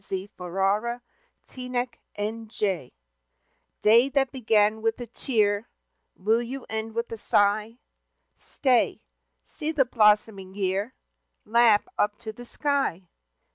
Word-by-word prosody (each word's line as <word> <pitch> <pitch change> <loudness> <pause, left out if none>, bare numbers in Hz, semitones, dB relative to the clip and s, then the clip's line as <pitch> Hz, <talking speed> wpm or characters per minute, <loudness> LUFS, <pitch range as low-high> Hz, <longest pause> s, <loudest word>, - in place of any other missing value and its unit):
X - - -10
Good 195 +2 -5
Bye 195 +6 -1 0.5
Sorrow 225 - -4 0.9
Day 230 +5 +6
that 270 -2 +1
began 220 -4 +2
with 225 +2 0
a 245 - -5
tear, 215 -3 0 0.5
Will 220 +5 +1
you 250 +2 -6
end 220 0 -4
with 235 0 -2
a 230 - -4
sigh? 210 +2 +1 0.6
Stay! 255 -4 +1 0.4
See 310 +1 -4
the 290 -4 +2
blossoming 210 -4 +2
year, 200 +5 -1 0.5
Laugh 225 -1 +4
up 205 0 +1
to 220 -1 -7
the 245 +2 -11
sky. 270 - -1
220 Hz, 115 wpm, -26 LUFS, 205-245 Hz, 0.9 s, Day